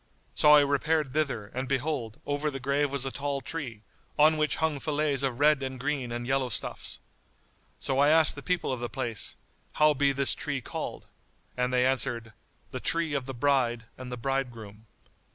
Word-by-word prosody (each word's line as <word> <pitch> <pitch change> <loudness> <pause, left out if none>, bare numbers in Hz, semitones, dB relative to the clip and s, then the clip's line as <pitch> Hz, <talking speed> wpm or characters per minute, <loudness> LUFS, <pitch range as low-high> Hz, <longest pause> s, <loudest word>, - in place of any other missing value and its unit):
So 150 0 +7
I 145 - +8
repaired 145 0 +1
thither, 135 -9 -1
and, 130 +2 -3
behold, 135 -5 -2
over 145 +1 -1
the 135 -2 -5
grave 140 +2 +1
was 135 -1 -1
a 135 - -2
tall 140 0 -2
tree, 130 -8 -6 0.3
on 155 +2 +6
which 155 0 +1
hung 160 -3 0
fillets 150 -2 0
of 130 -3 -1
red 150 -1 +4
and 130 -1 -4
green 135 -3 -2
and 120 0 -4
yellow 135 0 0
stuffs.[FN#93] 110 - -4 0.8
So 135 0 +1
I 145 +1 +5
asked 160 0 +5
the 145 - -8
people 180 -3 -1
of 125 - -4
the 120 0 -3
place, 120 -3 -3 0.4
"How 150 0 +5
be 140 0 +2
this 140 0 +2
tree 145 -3 -3
called?"; 125 - -6 0.5
and 125 0 0
they 125 0 +3
answered, 120 -4 0 0.4
"The - - -4
tree 165 -2 0
of 135 -2 -2
the 135 - -5
Bride 120 -3 +1
and 130 -1 -8
the 125 - -4
Bridegroom." 115 -5 -4
135 Hz, 190 wpm, -28 LUFS, 125-150 Hz, 0.8 s, I